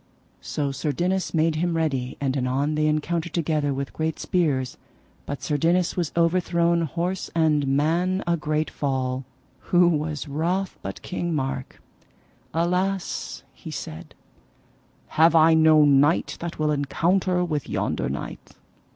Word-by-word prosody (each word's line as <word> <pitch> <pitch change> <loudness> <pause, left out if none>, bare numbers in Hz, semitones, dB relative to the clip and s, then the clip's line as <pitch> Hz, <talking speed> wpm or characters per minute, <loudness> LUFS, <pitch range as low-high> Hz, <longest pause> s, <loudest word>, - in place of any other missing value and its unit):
So 145 -2 -2
Sir 145 +2 -2
Dinas 180 +6 -1
made 160 -1 +1
him 170 0 0
ready, 135 -6 -1
and 135 -1 -1
anon 135 +3 0
they 155 0 +1
encountered 160 +2 -1
together 155 -3 0
with 140 0 -4
great 160 0 -2
spears, 140 -8 0 0.5
but 145 -2 -5
Sir 150 - 0
Dinas 170 +4 +2
was 175 -4 -1
overthrown, 170 0 +2
horse 175 +4 -2
and 155 -3 +2
man, 165 +7 +1
a 170 - +2
great 155 -1 -1
fall. 130 -2 -2 0.4
Who 175 -1 +5
was 155 -2 -1
wroth 175 +7 -1
but 95 0 -7
King 175 -2 -2
Mark! 135 -2 -3 0.7
Alas, 180 +3 -1
he - - -10
said, 80 +2 -7 0.9
have 165 +1 +4
I 160 0 +6
no 160 -1 +6
knight 145 +3 +3
that 170 0 -5
will 155 -1 +1
encounter 180 +5 +1
with 150 -4 -3
yonder - - -1
knight? - - -7
160 Hz, 140 wpm, -24 LUFS, 145-170 Hz, 0.9 s, I